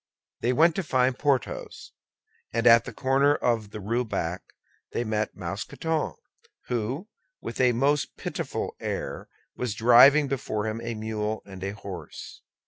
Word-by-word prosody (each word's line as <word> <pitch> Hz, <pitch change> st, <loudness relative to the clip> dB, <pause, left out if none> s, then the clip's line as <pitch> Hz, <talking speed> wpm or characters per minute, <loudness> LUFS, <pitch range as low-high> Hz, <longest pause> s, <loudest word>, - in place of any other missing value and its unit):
They 120 Hz, -, +1 dB
went 160 Hz, +6 st, +5 dB
to 195 Hz, -, 0 dB
find 130 Hz, -4 st, +2 dB
Porthos, 140 Hz, -2 st, -2 dB, 0.6 s
and 115 Hz, 0 st, -1 dB
at 115 Hz, -1 st, +7 dB
the -, -, -6 dB
corner 140 Hz, +2 st, +3 dB
of 115 Hz, -6 st, 0 dB
the 105 Hz, -, -7 dB
Rue 115 Hz, +5 st, 0 dB
Bac 90 Hz, -6 st, -3 dB, 0.5 s
met 110 Hz, -2 st, -1 dB
Mousqueton, 110 Hz, -, -3 dB, 0.6 s
who, 125 Hz, -, -2 dB, 0.3 s
with -, -, -4 dB
a 125 Hz, -1 st, +4 dB
most 140 Hz, +4 st, +1 dB
pitiable -, -, -4 dB
air, -, -, -4 dB, 0.3 s
was 120 Hz, -4 st, -3 dB
driving 125 Hz, +6 st, +7 dB
before 110 Hz, -6 st, -2 dB
him 110 Hz, +1 st, -3 dB
a 115 Hz, 0 st, -4 dB
mule 110 Hz, 0 st, -3 dB
and 95 Hz, -2 st, -9 dB
a 100 Hz, +1 st, -3 dB
horse. 100 Hz, -4 st, -9 dB
120 Hz, 140 wpm, -26 LUFS, 110-135 Hz, 0.6 s, at